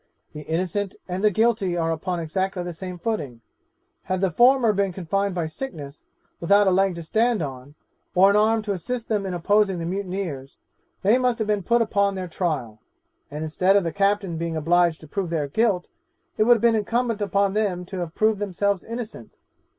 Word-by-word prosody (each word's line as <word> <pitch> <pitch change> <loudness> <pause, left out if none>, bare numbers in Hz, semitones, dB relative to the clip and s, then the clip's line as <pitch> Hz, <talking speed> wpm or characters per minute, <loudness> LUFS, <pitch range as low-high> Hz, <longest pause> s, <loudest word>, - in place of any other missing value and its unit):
The 150 - -7
innocent 185 +5 -2
and 185 +2 -4
the 210 - +6
guilty 210 -3 +1
are 165 -1 0
upon 175 +2 -2
exactly 185 +3 -2
the 175 0 -5
same 180 +2 -7
footing 155 - -4 0.6
had 185 0 -1
the 190 -1 +1
former 240 +3 +4
been 200 -1 0
confined 195 +2 -2
by 170 -2 -1
sickness, 155 - -7 0.3
without 200 +4 +4
a 190 - +4
leg 190 0 +2
to 170 - -6
stand 220 +3 +1
on, 135 0 -8 0.4
or 190 +2 +6
an - - +1
arm 220 +1 +3
to 210 - -3
assist 225 +6 -4
them 205 -3 0
in 180 - -3
opposing 200 +2 +2
the 165 - -4
mutineers, 180 -7 -4 0.5
they 215 +6 +4
must 250 -2 +1
have 220 - -2
been 210 -1 +1
put 235 +5 +2
upon 200 -2 +1
their 185 -1 -4
trial, 150 - -3 0.5
and 150 +2 -5
instead 180 +5 +2
of 200 - +4
the 165 - -3
captain 200 -3 +1
being 165 0 -3
obliged 170 +1 +2
to 155 - -12
prove 190 +2 -3
their 155 -4 -1
guilt, 195 +3 0 0.5
it 215 - +2
would 240 +1 +7
have 225 - -3
been 235 -1 +4
incumbent 230 +1 0
upon 200 0 +1
them 195 -4 -1
to 190 +1 -6
have 170 -2 -5
proved 215 -1 +2
themselves 200 -1 -1
innocent. 230 - -7
190 Hz, 195 wpm, -24 LUFS, 170-210 Hz, 0.6 s, would